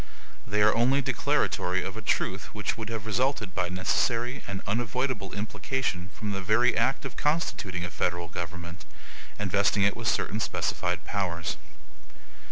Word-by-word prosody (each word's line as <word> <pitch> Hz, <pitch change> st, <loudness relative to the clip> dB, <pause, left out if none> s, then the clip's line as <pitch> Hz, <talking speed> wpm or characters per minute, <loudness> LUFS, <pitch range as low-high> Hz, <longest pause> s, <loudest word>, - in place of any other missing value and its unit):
They 105 Hz, +1 st, +3 dB
are 105 Hz, -, +6 dB
only 130 Hz, +4 st, +3 dB
declaratory 120 Hz, -9 st, +1 dB
of 95 Hz, -, -4 dB
a 110 Hz, -, -5 dB
truth 95 Hz, -2 st, 0 dB
which 105 Hz, -1 st, -1 dB
would 110 Hz, 0 st, -5 dB
have 110 Hz, -2 st, -4 dB
resulted 110 Hz, -3 st, 0 dB
by 90 Hz, 0 st, 0 dB
necessary 115 Hz, +7 st, +1 dB
and 100 Hz, -1 st, -4 dB
unavoidable 115 Hz, -1 st, -1 dB
implication 105 Hz, -2 st, -2 dB
from 105 Hz, -2 st, -4 dB
the 95 Hz, -1 st, -2 dB
very 110 Hz, +6 st, +4 dB
act 135 Hz, +1 st, +1 dB
of 135 Hz, -, -5 dB
constituting 100 Hz, -, 0 dB
a 85 Hz, -, -5 dB
federal 85 Hz, -2 st, -1 dB
government, 85 Hz, +1 st, -6 dB, 0.5 s
and 100 Hz, -2 st, -2 dB
vesting 100 Hz, +1 st, +3 dB
it 100 Hz, -, +3 dB
with 115 Hz, 0 st, -4 dB
certain 110 Hz, -1 st, +1 dB
specified 90 Hz, -4 st, -1 dB
powers. 90 Hz, -5 st, -1 dB
105 Hz, 155 wpm, -28 LUFS, 90-120 Hz, 0.5 s, are